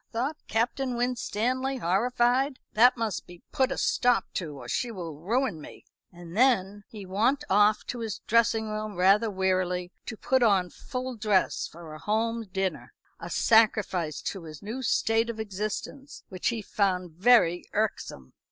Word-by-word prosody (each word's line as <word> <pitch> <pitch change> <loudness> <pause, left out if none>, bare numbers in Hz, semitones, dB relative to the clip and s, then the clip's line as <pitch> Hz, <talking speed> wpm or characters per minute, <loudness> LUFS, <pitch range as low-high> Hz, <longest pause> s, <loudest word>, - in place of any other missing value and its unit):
thought 255 +7 -2
Captain 245 +3 -1
Winstanley, 250 +2 -1
horrified. 245 +7 +1 0.2
"That 245 +4 +5
must 215 -10 -3
be 175 -1 -14
put 265 0 +1
a - - -2
stop 245 -1 +2
to, 155 -6 -4
or 120 - -10
she 240 - -1
will 175 -7 -6
ruin 210 - -1
me." - - -12 0.3
And 175 -1 -11
then 205 -5 +2
he 210 -3 -9
wont 230 +10 +1
off 210 +2 +4
to 245 - -5
his 220 -3 -4
dressing 230 -1 +2
room 215 -1 -4
rather 195 +5 +4
wearily, 185 -2 -1 0.2
to 220 - -5
put 260 +4 +1
on 195 -6 +3
full 255 -1 -5
dress 210 -3 +1
for 165 -1 -11
a 155 - -9
home 225 +3 -1
dinner, 190 0 -3 0.3
a - - -7
sacrifice 205 -8 +2
to 190 -4 -5
his 155 -2 -10
new 225 +6 -5
state 225 -1 +1
of 225 -1 -5
existence 215 +7 -5
which 185 -2 -3
he 230 -2 -1
found 185 -4 -1
very 175 -1 +4
irksome. 200 - -3
215 Hz, 160 wpm, -27 LUFS, 185-240 Hz, 0.3 s, That